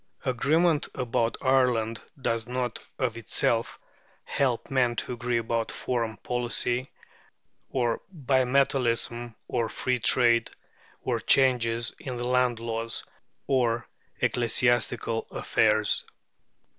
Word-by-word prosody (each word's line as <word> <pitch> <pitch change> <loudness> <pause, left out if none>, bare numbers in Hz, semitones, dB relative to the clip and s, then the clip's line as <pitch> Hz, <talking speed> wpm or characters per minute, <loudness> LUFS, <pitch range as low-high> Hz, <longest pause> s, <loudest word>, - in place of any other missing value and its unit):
Agreement 150 +5 +2
about 120 -2 0
Ireland 125 -4 +2 0.2
does 115 -3 -1
not, 125 -2 -2 0.2
of 120 -4 -1
itself, 115 0 0 0.5
help 130 -3 -1
men 125 -3 +2
to 125 - -3
agree 120 0 -1
about 115 0 -1
foreign 115 -3 -2
policy, 125 +1 -1 0.8
or 120 -3 0
bimetallism, 125 - +1
or 115 -2 -1
free 125 +3 -1
trade, 115 -1 +4 0.5
or - - 0
changes 120 -3 +3
in 130 -3 -5
land 125 -1 +1
laws, 115 0 -3 0.4
or 120 -3 +1 0.3
ecclesiastical 120 -1 +1
affairs. 110 -1 +2
120 Hz, 95 wpm, -27 LUFS, 115-130 Hz, 0.8 s, trade